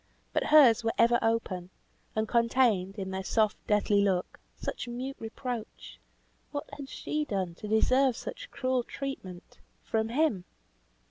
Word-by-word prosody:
But - - +1
hers 255 -7 +7
were 225 - 0
ever 235 +1 +5
open, 210 -6 -1 0.5
and 220 0 0
contained, 230 -5 +2
in 190 -1 -4
their 190 0 -3
soft, 215 +1 +2
deathly 210 -1 +3
look, 190 -3 0 0.2
such - - -4
mute 255 +3 -4
reproach! 225 0 -6 0.5
What 285 -1 -5
had 275 -2 -8
she 305 +3 -2
done 190 - -2
to 210 - -7
deserve 255 +4 +3
such - - -7
cruel 255 -1 0
treatment 235 -9 -7 0.2
from 220 0 -1
him? 240 - +1
225 Hz, 140 wpm, -29 LUFS, 200-260 Hz, 0.5 s, hers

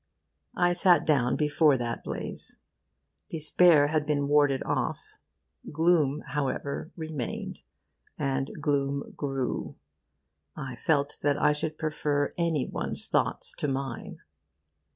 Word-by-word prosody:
I 175 0 +3
sat 175 -3 +4
down 125 -5 +2
before 150 -1 +3
that 120 -1 -4
blaze. - - -5 0.7
Despair 155 -1 +4
had 155 -1 +1
been 145 -1 0
warded 145 -2 +3
off. - - 0 0.7
Gloom, 155 -2 +2
however, 140 +1 -2
remained; 155 -6 -5 0.6
and 135 -1 -1
gloom 140 -1 -1
grew. 135 -3 -3 0.8
I 130 -2 -6
felt 145 +2 0
that 145 0 +1
I - - +4
should 155 +1 -2
prefer 150 -2 -1
any 165 -5 0
one's - - -1
thoughts - - 0
to - - 0
mine. 135 -3 -4
145 Hz, 110 wpm, -28 LUFS, 140-155 Hz, 0.8 s, sat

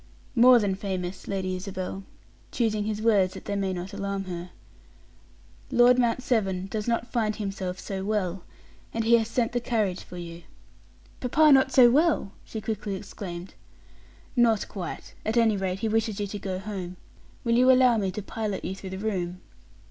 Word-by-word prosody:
"More 250 +1 +8
than 205 -4 +1
famous, 190 -2 -4
Lady 185 -1 -2
Isabel," 185 0 -5 0.5
choosing 215 -3 0
his 215 0 -3
words, 200 -5 +3
that - - -9
they 205 - -2
might 195 -1 -1
not 180 +3 -6
alarm 200 -1 -3
her, 180 -1 -6 1.2
"Lord 245 +1 +5
Mount 240 +1 +1
Severn 195 -8 0
does 210 +2 -4
not 235 0 -1
find 220 -3 0
himself 195 -3 -4
so 190 -1 -4
well, 195 -3 -1 0.5
and 225 - 0
he 235 +1 +5
has 220 - -2
sent 230 0 0
the 245 - 0
carriage 215 -6 -1
for 180 - -10
you." 170 -1 -8 0.8
"Papa 300 +5 +4
not 265 -1 +5
so 245 -3 +7
well!" 300 - +2
she 220 - -6
quickly 215 -2 -3
exclaimed. 180 -1 -7 0.8
"Not 230 -4 +3
quite. 185 -4 -7
At 220 +2 -1
any 225 -2 +4
rate, 190 0 -2
he 225 - 0
wishes 220 -1 0
you 205 - 0
to 205 +1 -6
go 190 -1 -3
home. 185 -2 -6 0.5
Will 235 -2 +1
you 255 +2 +6
allow 255 -2 +5
me 195 -3 0
to 195 +2 -5
pilot 210 -1 -4
you - - -2
through 195 0 -8
the 190 - -5
room?" 185 -4 -2
205 Hz, 180 wpm, -27 LUFS, 190-230 Hz, 1.2 s, More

